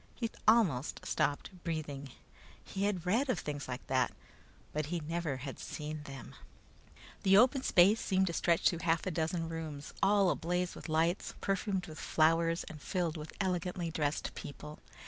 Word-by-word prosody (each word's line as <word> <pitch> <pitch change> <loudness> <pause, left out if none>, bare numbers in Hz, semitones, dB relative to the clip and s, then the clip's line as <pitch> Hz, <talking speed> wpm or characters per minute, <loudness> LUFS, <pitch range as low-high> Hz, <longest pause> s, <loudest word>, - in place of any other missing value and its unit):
He 230 -2 -2 0.2
almost 185 - +3
stopped 155 +4 -1
breathing. 145 -5 -4 0.5
He 195 +1 -2
had 190 -4 -1
read 235 +10 +2
of 255 - +2
things 145 -1 -4
like 125 0 -5
that, 130 -2 +2 0.6
but 155 -1 -1
he 175 +2 -1
never 160 -2 -2
had 135 +1 -7
seen 155 0 -5
them. 135 -4 -9 0.9
The 195 0 +6
open 260 +4 +5
space 200 0 +5
seemed 190 -1 +2
to 170 - -2
stretch 170 0 +3
through 170 - +1
half 165 -1 +1
a 185 - -1
dozen 165 +1 -1
rooms, 160 -3 -6
all 200 -2 +5
ablaze 180 +1 -1
with - - -9
lights, 165 +4 +1
perfumed 195 -1 -1
with 155 -1 -9
flowers, 165 +1 +2
and 155 -3 -10
filled 175 -3 -1
with 155 -1 -7
elegantly 180 -3 -1
dressed 150 -1 -1
people. 150 +1 -8
165 Hz, 165 wpm, -33 LUFS, 150-185 Hz, 0.9 s, The